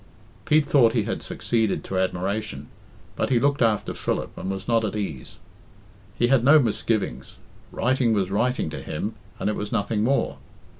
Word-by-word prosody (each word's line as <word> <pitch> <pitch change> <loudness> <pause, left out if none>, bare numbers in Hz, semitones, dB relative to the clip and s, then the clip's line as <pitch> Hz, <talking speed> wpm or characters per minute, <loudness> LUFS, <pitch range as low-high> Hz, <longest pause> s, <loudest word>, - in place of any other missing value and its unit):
Pete 155 -1 +4
thought 125 -5 +4
he 115 - +2
had - - -3
succeeded 115 -3 -1
to 95 - -2
admiration, 95 -4 -2 0.5
but - - -1
he 125 -3 +3
looked 140 +2 +1
after 110 -3 +1
Philip, - - -3
and 95 - -5
was 95 0 -4
not 115 -1 +2
at 110 -1 -2
ease. 85 -11 -5 0.8
He 120 - +2
had 130 -3 +4
no 140 +5 +7
misgivings. 110 - -1 0.4
Writing 125 -1 +1
was 100 -3 0
writing 120 -4 0
to - - -6
him, - - -4 0.2
and - - -2
it 105 - 0
was 105 0 -4
nothing 105 +1 0
more. 135 +4 0
110 Hz, 170 wpm, -24 LUFS, 100-125 Hz, 0.8 s, no